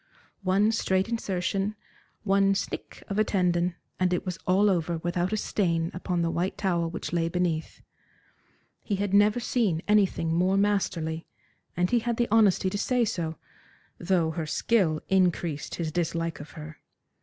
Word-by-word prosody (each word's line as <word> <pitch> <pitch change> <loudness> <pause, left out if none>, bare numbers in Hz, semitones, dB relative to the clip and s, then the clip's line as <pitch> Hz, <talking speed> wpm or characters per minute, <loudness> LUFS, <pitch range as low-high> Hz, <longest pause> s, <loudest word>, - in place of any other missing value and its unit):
One 200 +3 +3
straight 190 -4 +1
insertion, 195 -2 -1 0.5
one 195 -1 +3
snick 195 - -5
of 200 +1 -2
a - - +5
tendon, 180 -3 +1 0.2
and 185 -1 +2
it 180 - -1
was 180 -2 -4
all 190 +3 +4
over 170 -3 +1
without 175 +3 -1
a 215 - 0
stain 170 -5 0
upon 180 -1 -1
the 165 - 0
white 175 +3 -2
towel 170 -4 0
which 170 - -6
lay 165 -1 +1
beneath. 170 -2 -2 1.0
He 205 - -2
had 200 0 -2
never 205 +3 +5
seen 215 -9 0
anything 195 -6 +2
more 185 +3 +2
masterly, 170 -6 0 0.5
and 180 0 +1
he 240 - +4
had 235 0 -2
the 240 - +1
honesty 205 -4 +4
to 205 - -2
say 250 +2 +2
so, 170 -7 -3 0.6
though 170 -3 +1
her 160 -1 -4
skill 165 -4 +1
increased 175 -5 0
his 160 -2 -3
dislike 165 0 -2
of 145 +2 -10
her. 155 -1 -9
185 Hz, 160 wpm, -27 LUFS, 170-200 Hz, 1.0 s, a